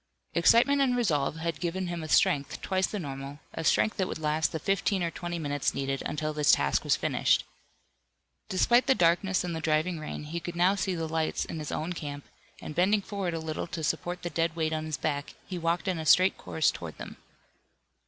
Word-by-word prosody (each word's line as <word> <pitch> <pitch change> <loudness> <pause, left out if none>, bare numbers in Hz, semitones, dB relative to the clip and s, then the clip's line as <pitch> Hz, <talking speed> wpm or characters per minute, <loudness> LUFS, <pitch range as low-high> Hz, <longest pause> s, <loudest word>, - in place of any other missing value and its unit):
Excitement 280 +5 +5
and 250 -2 +2
resolve 155 - +1
had 165 -1 -3
given 180 +2 -2
him 175 -1 -4
a 155 - -6
strength 140 -2 +2
twice 190 0 +1
the 210 - -4
normal, 140 -4 -6 0.2
a - - -4
strength 215 +6 +2
that 190 -2 0
would - - -4
last 155 0 0
the - - -2
fifteen 195 +2 0
or 170 - -1
twenty 175 0 -4
minutes 145 -3 -1
needed 135 0 -2
until 155 +1 -2
this 150 -1 +4
task 70 0 +2
was - - +3
finished. - - +2 1.1
Despite 240 +7 +3
the 265 - +5
darkness 180 +1 +2
and 175 -2 -3
the 160 - -4
driving 160 +2 +1
rain, 155 -1 -6
he 160 +3 -4
could 175 +1 -6
now 180 +3 +4
see 195 -2 -1
the 165 -1 -2
lights 160 0 -1
in 160 - -6
his 150 - -5
own 165 +3 -2
camp, 145 -3 -6 0.4
and - - -6
bending 195 +5 +2
forward 195 -4 -3
a - - -2
little 160 +1 -4
to 165 -2 -5
support 175 +4 -2
the 175 - -3
dead 165 0 0
weight 160 -1 0
on 155 0 -2
his 155 -1 -3
back, 145 -2 -3
he 180 -2 -5
walked 170 +2 -1
in 180 -3 0
a 160 - -4
straight 185 +4 +6
course 160 - 0
toward - - -8
them. - - -9
165 Hz, 215 wpm, -28 LUFS, 155-185 Hz, 1.1 s, straight